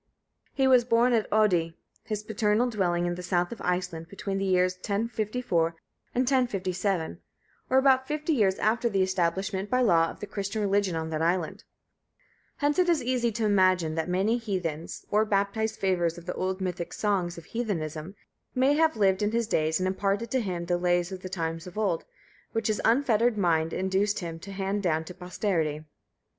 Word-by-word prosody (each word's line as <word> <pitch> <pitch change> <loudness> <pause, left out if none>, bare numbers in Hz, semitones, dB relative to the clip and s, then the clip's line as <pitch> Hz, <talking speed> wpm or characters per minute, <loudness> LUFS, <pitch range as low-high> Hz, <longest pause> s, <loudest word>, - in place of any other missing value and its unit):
He 270 -1 +3
was 255 -2 +6
born 240 +1 +3
at 225 -2 +1
Oddi, 180 -6 +2 0.3
his 215 -1 -3
paternal 220 +2 +1
dwelling 175 -5 0
in 175 - 0
the 180 - -6
south 175 0 0
of 235 - -7
Iceland, 180 -2 -2
between 195 0 -4
the 195 - -1
years 185 -1 +3
1054 210 -4 -1 0.4
and 250 - +3
1057, 195 - 0 0.5
or 260 - +3
about 265 -1 +4
50 300 +2 -1
years 200 -8 +2
after 235 +2 +1
the 195 -3 +2
establishment 190 +2 -1
by 255 0 +2
law 165 -8 +4
of - - -10
the - - -5
Christian 205 +1 -3
religion 200 -3 +1
in 160 0 -3
that 155 0 -2
island; 170 0 -1 0.9
hence 295 +2 +1
it 360 -1 +3
is 335 -3 +2
easy 240 -1 +1
to 220 +1 -1
imagine 185 -5 +3
that 160 +2 -2
many 200 +6 +1
heathens, 180 -8 -4
or 210 +1 +4
baptized 210 +1 0
favourers 175 -3 +1
of 170 - -11
the 180 - -3
old 185 +1 -2
mythic 180 -2 -3
songs 185 -5 -1
of 170 - -10
heathenism, 170 -6 -4 0.4
may 260 +3 +4
have 315 -2 +2
lived 195 -2 +3
in 210 +1 0
his 235 0 +1
days 160 -6 +1
and 185 - 0
imparted 200 +4 -1
to 260 - +2
him 180 -5 -3
the 175 0 0
lays 175 0 +1
of 190 -1 -6
the 185 - -6
times 165 -2 -3
of 180 - -10
old, 200 -6 0 0.5
which 225 0 0
his 215 - 0
unfettered 235 -2 +3
mind 165 -4 +2
induced 190 +2 0
him 165 -2 -5
to 200 +4 -9
hand 195 +1 -2
down 160 -4 +1
to 180 - -9
posterity. 180 -4 -2
195 Hz, 185 wpm, -27 LUFS, 175-220 Hz, 0.9 s, was